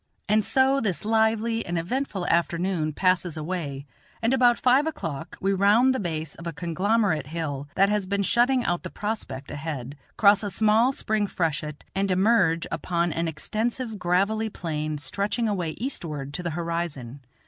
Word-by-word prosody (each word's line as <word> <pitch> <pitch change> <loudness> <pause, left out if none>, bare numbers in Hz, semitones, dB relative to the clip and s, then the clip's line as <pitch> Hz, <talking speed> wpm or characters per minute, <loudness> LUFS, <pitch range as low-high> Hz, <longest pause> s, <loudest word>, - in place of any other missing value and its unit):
And 215 +1 +3
so 265 +4 +3
this 195 -5 -2
lively 225 +1 +2
and 175 0 -3
eventful 195 +1 -2
afternoon 170 -1 +1
passes 180 0 +1
away, 150 -4 -4 0.3
and 230 +2 +1
about 245 -2 +5
five 260 +4 +3
o'clock 165 - -5
we 195 +1 +1
round 210 +7 +4
the 260 - -2
base 160 -5 -3
of 170 - -9
a - - -2
conglomerate 180 -1 0
hill 145 -3 -4
that 195 - +5
has 210 -2 0
been 200 +1 0
shutting 245 +4 +2
out 175 0 0
the - - -6
prospect 205 -11 -5
ahead, 145 -3 -5 0.2
cross 200 -1 +6
a 205 - -3
small 220 +5 +3
spring 215 -5 -1
freshet, 155 -4 -2
and 195 0 0
emerge 185 -3 +3
upon 170 -2 -1
an 165 0 -1
extensive 220 - -3
gravelly 200 +5 +1
plain 155 -5 -3
stretching 200 - -1
away 180 -6 -1
eastward 155 - -4
to 180 - -4
the 175 - -2
horizon. 165 -7 -3
185 Hz, 160 wpm, -25 LUFS, 160-220 Hz, 0.3 s, cross